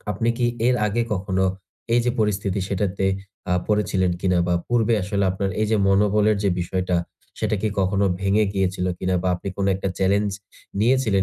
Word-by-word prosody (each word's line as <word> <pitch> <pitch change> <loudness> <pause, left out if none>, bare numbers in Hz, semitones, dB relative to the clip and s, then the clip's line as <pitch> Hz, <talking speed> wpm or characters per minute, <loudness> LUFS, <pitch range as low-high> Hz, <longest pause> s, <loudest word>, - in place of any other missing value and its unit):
আপনি 115 - -1
কি 120 - +2 0.2
এর 125 - +4
আগে 115 +3 0
কখনো 95 0 0 0.5
এই 120 - +5
যে 125 - +2
পরিস্থিতি 100 -2 0
সেটাতে 100 0 -1 0.5
আ - - +3 0.2
পড়েছিলেন 95 -3 +1
কিনা? 90 -2 +2
বা 90 - +2
পূর্বে 120 -1 +2
আসলে 100 +1 0
আপনার 95 +1 -2
এই 110 - +2
যে - - +4
মনোবলের 105 +2 +3
যে 100 - +4
বিষয়টা, 90 +1 -1 0.4
সেটা 110 0 0
কি 110 - +2
কখনো 100 +1 +1 0.2
ভেঙে 100 +2 +2
গিয়েছিল 95 -1 0
কিনা 95 0 0
বা 95 - +1
আপনি 95 +2 -6
কোন 100 - 0
একটা 95 - -2
challenge 100 +1 +1 0.5
নিয়েছিলেন 115 -5 +3
100 Hz, 175 wpm, -23 LUFS, 95-105 Hz, 0.5 s, এই